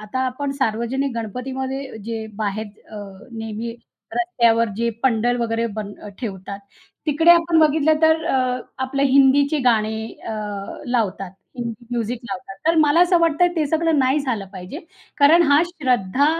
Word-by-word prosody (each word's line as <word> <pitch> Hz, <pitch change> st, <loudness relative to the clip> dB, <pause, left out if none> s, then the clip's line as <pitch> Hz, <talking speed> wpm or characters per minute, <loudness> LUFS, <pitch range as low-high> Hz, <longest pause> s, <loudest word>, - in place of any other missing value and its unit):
आता 215 Hz, +5 st, -4 dB
आपण 275 Hz, +3 st, -3 dB
सार्वजनिक 260 Hz, +3 st, 0 dB
गणपतीमध्ये 260 Hz, +3 st, -5 dB
जे 225 Hz, -1 st, -4 dB
बाहेर 215 Hz, 0 st, -2 dB, 0.2 s
अ, 215 Hz, -, -8 dB, 0.3 s
नेहमी 225 Hz, +1 st, -5 dB, 0.4 s
रस्त्यावर 235 Hz, -11 st, +2 dB
जे 235 Hz, +1 st, 0 dB
पंडल 245 Hz, -1 st, +2 dB
वगैरे 230 Hz, 0 st, 0 dB
बन 210 Hz, -2 st, -5 dB
अ, 210 Hz, -, -8 dB
ठेवतात. 200 Hz, -4 st, -6 dB, 0.5 s
तिकडे 315 Hz, +3 st, +4 dB
आपण 335 Hz, -1 st, +5 dB
बघितलं 310 Hz, 0 st, +3 dB
तर 320 Hz, 0 st, +4 dB
अ, 255 Hz, -4 st, +1 dB, 0.3 s
आपलं 275 Hz, +1 st, -2 dB
हिंदीची 280 Hz, +2 st, +4 dB
गाणी 220 Hz, -2 st, +2 dB, 0.2 s
अ, 225 Hz, -, -3 dB, 0.5 s
लावतात. 210 Hz, -6 st, -1 dB, 0.3 s
हिंदी 235 Hz, -1 st, -6 dB
म्युझिक 240 Hz, 0 st, -2 dB
लावतात. 250 Hz, -6 st, -7 dB
तर 330 Hz, -, +4 dB
मला 305 Hz, +2 st, +4 dB
असं 355 Hz, 0 st, +5 dB
वाटतंय 335 Hz, +1 st, +3 dB
ते 310 Hz, -2 st, +1 dB
सगळं 320 Hz, 0 st, +1 dB
नाही 265 Hz, +2 st, +3 dB
झालं 235 Hz, -8 st, -3 dB
पाहिजे. 185 Hz, +8 st, -8 dB, 0.4 s
कारण 310 Hz, +4 st, +6 dB
हा 295 Hz, +3 st, +6 dB
श्रद्धा 260 Hz, -, +1 dB
255 Hz, 145 wpm, -21 LUFS, 225-295 Hz, 0.5 s, कारण